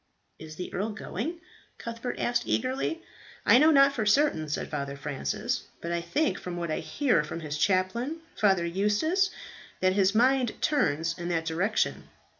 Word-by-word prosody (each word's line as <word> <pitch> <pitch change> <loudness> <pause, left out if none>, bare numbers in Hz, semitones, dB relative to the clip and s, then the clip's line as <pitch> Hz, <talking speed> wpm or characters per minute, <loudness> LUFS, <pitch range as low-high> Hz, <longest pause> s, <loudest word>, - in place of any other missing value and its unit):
"Is 155 0 -9
the 180 - -6
earl 205 +4 -1
going?" 320 +10 -5 0.4
Cuthbert 235 +1 -5
asked 240 0 0
eagerly. 270 +6 -1 0.4
"I - - +7
know 305 +3 +6
not 275 -2 +6
for 245 -5 -1
certain," 210 - +2
said 150 - -2
Father 140 -2 -4
Francis; 140 -1 -3
"but 170 - -5
I 170 0 0
think 285 - 0
from 180 -1 -6
what 170 -2 -3
I - - -1
hear 255 - +1
from 160 +2 -6
his 150 -2 -4
chaplain, 200 - 0 0.2
Father 190 -5 +3
Eustace, 210 - +1 0.5
that 185 0 +3
his 195 +1 +2
mind 250 0 +3
turns 165 - +1
in 175 0 -4
that 165 -2 -1
direction." 175 +7 0
200 Hz, 165 wpm, -28 LUFS, 165-260 Hz, 0.5 s, I